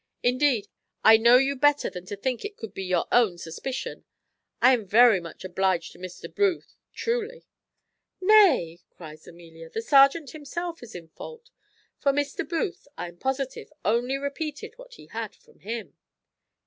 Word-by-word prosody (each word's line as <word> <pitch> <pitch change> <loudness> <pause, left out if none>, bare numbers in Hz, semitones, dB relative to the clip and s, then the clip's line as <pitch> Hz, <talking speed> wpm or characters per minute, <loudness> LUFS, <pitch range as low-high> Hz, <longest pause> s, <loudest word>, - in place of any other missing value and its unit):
Indeed, 250 -3 +2 0.4
I 220 0 +8
know 235 +2 +6
you 270 +2 +1
better 290 +2 +3
than 180 0 -8
to 205 - -5
think 245 +5 -3
it 415 0 -7
could 225 - -8
be - - -6
your 185 -1 0
own 220 -8 +3
suspicion. 170 +11 -6 0.6
I 255 +2 +6
am 225 -5 -1
very 225 0 +6
much 170 -2 -11
obliged 185 -2 0
to - - -16
Mr. 185 -1 -9
Booth 395 -4 0 0.2
truly." 475 +1 -3 0.7
"Nay," 365 - +4
cries 155 -2 -13
Amelia, 165 -1 -13
"the 225 - -4
serjeant 275 +2 +4
himself 330 +3 -6
is 235 -4 -11
in 165 -2 -9
fault; 470 - -11 0.5
for 280 - +2
Mr. 285 +4 -3
Booth, 350 -1 -3
I 175 - -5
am 175 - -17
positive, 265 +5 -3
only 240 +5 +1
repeated 290 +6 -5
what - - -14
he - - -14
had - - -6
from 465 -1 -25
him." 225 +2 -6
255 Hz, 160 wpm, -26 LUFS, 190-305 Hz, 0.7 s, I